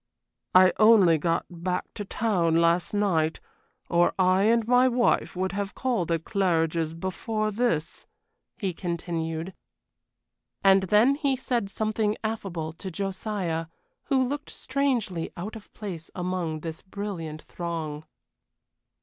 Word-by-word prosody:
"I 185 0 +7
only 205 -7 +6
got 165 +2 0
back 180 +1 -4
to 205 - -5
town 190 -6 +1
last 170 +1 +3
night, 175 -7 +1 0.5
or 175 0 +3
I 185 +1 +4
and 230 0 +3
my 250 +1 +5
wife 245 -5 +1
would 185 +1 -1
have 200 0 -3
called 235 -10 -1
at 165 -1 0
Claridge's 165 -5 0
before 215 +5 -2
this," 200 -8 -1 0.5
he 195 -4 -2
continued. 170 0 -3 1.1
And 195 0 +6
then 210 +8 +4
he 280 -2 0
said 245 -5 -1
something 215 0 -1
affable 185 -8 -3
to 190 +3 -7
Josiah, 185 -3 -3 0.4
who 260 -3 +2
looked 290 +3 -4
strangely 245 -11 -1
out 200 +6 -5
of 220 - -12
place 180 -7 -7
among 180 -4 -2
this 160 0 -6
brilliant 185 -6 -6
throng. 160 -3 -5
185 Hz, 125 wpm, -26 LUFS, 165-215 Hz, 1.1 s, I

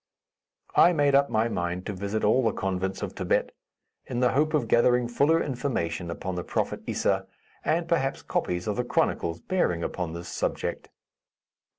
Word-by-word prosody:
I 175 - +7
made 145 -3 +3
up 140 0 +4
my 110 +1 +2
mind 90 -3 -3
to 105 - -3
visit 100 +3 -3
all 110 +5 +4
the 110 -3 +2
convents 95 0 -2
of - - -4
Thibet, - - 0 0.6
in 120 - -2
the 125 0 +3
hope 155 +3 +2
of 130 -6 +1
gathering 120 +2 +4
fuller 145 +7 +3
information 90 - -2
upon 95 +2 -4
the 90 -1 -3
prophet - - -2
Issa, - - 0 0.4
and 165 +1 +1
perhaps 145 -6 0
copies 90 0 -1
of 105 - -2
the 125 - +1
chronicles 85 -8 0
bearing 90 - 0
upon 85 -2 -3
this 85 +1 -7
subject. - - -3
110 Hz, 170 wpm, -27 LUFS, 90-140 Hz, 0.6 s, I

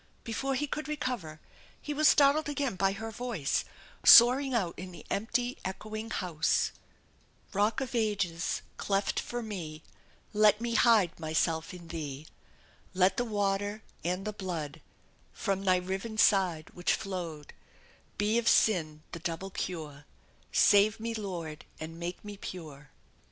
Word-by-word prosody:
Before 265 +4 -2
he 295 - 0
could 300 +2 -4
recover, 250 - -3 0.4
he 295 - -4
was 305 +1 +4
startled 295 +1 +5
again 280 -6 -1
by 195 +1 +2
her 220 +2 -6
voice 220 - -1 0.4
soaring 255 +4 +8
out 200 -9 0
in 185 0 -8
the 170 -4 -12
empty 245 +4 -1
echoing 215 +4 -5
house: 170 -7 0 0.8
Rock 210 +4 +1
of 260 -2 -4
ages, 200 -7 -1
cleft 195 0 0
for 240 0 -4
me, 165 -8 -6 0.5
Let 210 0 +5
me 235 0 -2
hide 220 -9 +4
myself 160 0 0
in 175 -2 -11
Thee; 150 -3 -5 0.7
Let 190 +1 +3
the 245 - +1
water 205 -1 -1 0.2
and 180 +3 -2
the 215 - -3
blood 165 -6 -5 0.5
From 195 0 -2
Thy 185 -1 +5
riven 190 +5 -3
side 185 -7 +3
which 175 - 0
flowed, 170 -6 -6 0.6
Be 210 +3 +2
of 235 - -3
sin 155 -7 +3
the 170 - -6
double 170 +4 -4
cure, 150 -6 -5 0.5
Save 205 +2 +5
me 230 +1 -3
Lord 175 -8 -5 0.2
and 165 +1 -7
make 175 +3 -5
me 205 -1 -7
pure! 150 -7 -9
195 Hz, 140 wpm, -30 LUFS, 165-225 Hz, 0.8 s, soaring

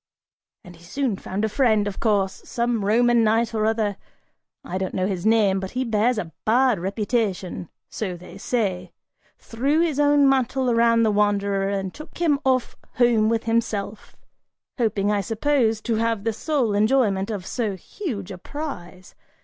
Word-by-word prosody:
And 180 0 -13
he 170 - -19
soon 250 +5 -2
found 200 +4 -3
a - - +1
friend, 220 -3 +2
of 200 - -5
course: 200 -4 0
some 235 -2 -1
Roman 235 +3 +3
knight 225 +1 +2
or 215 -1 +1
other, 215 -3 0 0.7
I 185 +2 -3
don't 190 -1 -3
know 185 - 0
his 190 0 -2
name, 210 -4 +3
but 190 0 -5
he 260 - +1
bears 225 +2 +1
a 170 -6 -4
bad 245 0 +3
reputation, 195 -2 -2 0.2
so 185 -5 -4
they 180 +2 -12
say, 195 -6 -2 0.4
threw 275 +7 -1
his 325 -4 +1
own 290 -1 +4
mantle 265 -1 +1
around 230 0 +4
the 220 - +3
wanderer 200 -1 +1
and 195 -2 -3
took 305 - -11
him 315 -5 +2
off 255 -2 +1 0.2
home 235 -3 +3
with 230 0 0
himself, 225 -2 -2 0.6
hoping, 210 -3 +1
I 205 -1 +1
suppose, 225 0 +1
to 230 -1 -1
have 225 -2 0
the 225 0 0
sole 250 -2 0
enjoyment 210 -2 +2
of 200 -5 -4
so 215 -4 -2
huge 200 - -6
a 180 - -8
prize. 185 - -8
220 Hz, 165 wpm, -23 LUFS, 200-240 Hz, 0.7 s, own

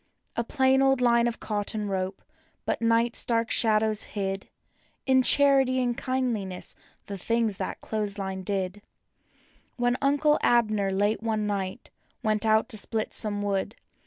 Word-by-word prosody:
A 235 - 0
plain 265 +2 +2
old 270 -1 +3
line 235 -1 +3
of 235 - -4
cot¬ 205 -2 -3
ton 210 0 -4
rope, 190 0 -3 0.4
but - - -2
night's 230 +1 +3
dark 230 -1 0
shadows 215 -1 +3 0.2
hid 195 -1 -3 0.6
In 260 -1 +4
charity 270 -1 +4
and 245 -1 0
kindli¬ 255 -6 -2
ness 180 -1 -8 0.3
the 200 -1 -7 0.6
clothes 210 -2 -3
line 190 -1 -4 1.3
When 245 0 +1
Uncle 290 +2 +2
Abner, 215 -4 +2
late 205 +3 0
one 220 -2 -1
night, 200 +2 -4 0.3
out 215 +1 +2
to 220 - -5
split 215 +1 -3
some 205 -2 -2
wood. 200 +2 -2
220 Hz, 135 wpm, -26 LUFS, 205-245 Hz, 1.3 s, In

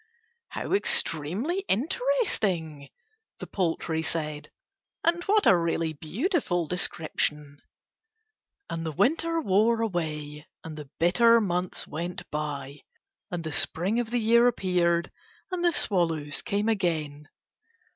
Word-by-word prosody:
"How - - -5
extremely 220 - +2
interesting," 200 - -1 0.5
the - - -7
poultry 165 -3 -1
said, 155 -2 -4 0.5
"and 340 +1 +2
what 420 +1 +3
a - - +7
really 165 -1 0
beautiful 180 - -1
description!" 150 -5 -1 1.1
And 165 0 -4
the 160 - -3
Winter 330 - +1
wore 225 -2 +2
away, 155 -7 -3 0.2
and 160 -1 -8
the 150 -3 -9
bitter 230 +7 +5
months 180 -3 -2
went 170 +3 -5
by, 145 -2 -4 0.5
and 175 -3 -4
the 160 - -4
Spring 185 +9 0
of 240 -2 -2
the 245 - 0
year 235 +1 +4
appeared, 175 -6 +1 0.4
and 360 -1 -2
the 345 - +4
swallows 165 - +1
came 210 -1 -1
again. 155 -8 -1
175 Hz, 115 wpm, -27 LUFS, 155-230 Hz, 1.1 s, a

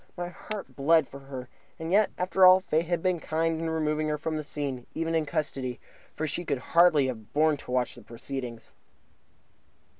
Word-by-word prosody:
My 175 0 -3
heart 190 -7 -7
bled 155 +1 +4
for 140 - -10
her. 135 -2 -8 0.3
And 160 +1 -5
yet, 210 +2 +4
after 185 +1 +1
all, 185 0 +9
Fate 165 -2 0
had 175 -1 -1
been 185 -2 +1
kind 160 +1 -1
in 165 - -1
removing 155 -1 0
her 150 0 0
from 155 +1 -3
the 155 - -3
scene, 140 -4 -4
even 165 0 -1
in 160 -2 +1
custody, 130 -4 -2 0.4
for 155 - -2
she 155 +3 -2
could 145 -5 -1 0.2
hardly 170 -4 +6
have 115 -5 -6
borne 155 +1 +4
to - - -12
watch 125 -1 +1
the 120 - -11
proceedings. 120 +1 -7
155 Hz, 190 wpm, -28 LUFS, 135-165 Hz, 0.4 s, all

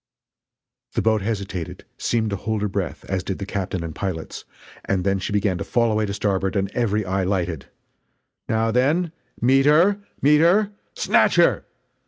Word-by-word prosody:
The - - +1
boat 110 -2 +2
hesitated 100 -5 -4
seemed 110 -2 0
to - - 0
hold 105 +1 -2
her - - +1
breath, 95 -2 -4
as 95 -2 -2
did 95 0 -3
the 100 - -5
captain 95 -3 -3
and 80 -1 -5
pilots 90 -4 -5 0.4
and 95 -2 0
then 100 0 +1
she 95 - -4
began 100 -3 0
to - - -2
fall 115 +1 +1
away 110 0 +1
to 100 - -3
starboard 95 -1 0
and 100 0 0
every 110 -3 0
eye 95 +1 0
lighted: 90 -5 -2 0.8
"Now 110 0 +1
then! 150 +8 +2 0.3
meet 135 +3 +4
her! 175 +7 +5 0.2
meet 150 +2 +5
her! 200 +5 +4 0.2
Snatch - - +3
her!" - - +3
105 Hz, 175 wpm, -22 LUFS, 95-120 Hz, 0.8 s, her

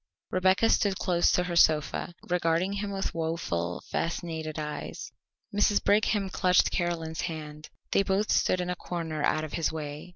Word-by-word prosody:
Rebecca 185 +4 +3
stood 200 -2 +2
close 175 -2 +2
to 180 - +3
her 175 -1 -3
sofa, 160 +1 +2
regarding 175 +2 +1
him 200 0 -3
with 195 -1 -3
woeful, 160 - -2
fascinated 160 -2 -3
eyes. 150 -2 -5 0.4
Mrs. 205 0 +3
Brigham 205 -1 +2
clutched 180 -2 +3
Caroline's 165 -3 -2
hand. 155 -2 -6 0.2
They - - +4
both 195 +2 0
stood 185 - +2
in 180 0 -2
a - - -2
corner 165 -4 -4
out 155 - +2
of 155 - -6
his 165 - 0
way. 150 +1 -6
170 Hz, 160 wpm, -28 LUFS, 155-185 Hz, 0.4 s, They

